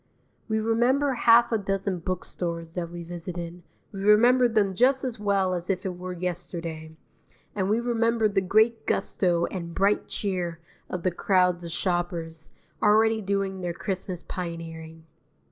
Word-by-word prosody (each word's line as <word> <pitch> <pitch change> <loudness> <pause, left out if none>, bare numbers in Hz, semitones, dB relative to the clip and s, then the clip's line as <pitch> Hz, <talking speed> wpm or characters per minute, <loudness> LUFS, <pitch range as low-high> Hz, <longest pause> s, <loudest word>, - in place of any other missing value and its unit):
We 220 -1 0
remember 245 +6 +2
half 235 0 +5
a 225 - +2
dozen 195 -1 -2
book 185 +1 -3
stores 165 -2 -5
that 170 -2 -3
we 175 0 -7
visited; 175 0 -6 0.3
we 195 - -7
remember 240 +5 +5
them 210 -4 +2
just 260 +7 +3
as 245 -4 -3
well 200 -3 +1
as 175 +1 -4
if 185 -1 -1
it 185 -2 -3
were 180 +1 -6
yesterday, 170 -3 -5 0.6
and 195 -2 -1
we 220 +2 +2
remember 230 -1 +1
the 200 -2 +1
great 220 +4 +2
gusto 170 -2 +1
and 170 -3 -6
bright 200 +2 +2
cheer 180 -5 -3 0.3
of 180 -2 -4
the 185 - +2
crowds 180 -1 +2
of 170 - -6
shoppers, 170 -3 -3 0.3
already 220 +1 +4
doing 195 -1 -2
their 175 -1 -2
Christmas 185 -1 -4
pioneering. 165 -2 -7
185 Hz, 155 wpm, -26 LUFS, 175-215 Hz, 0.6 s, half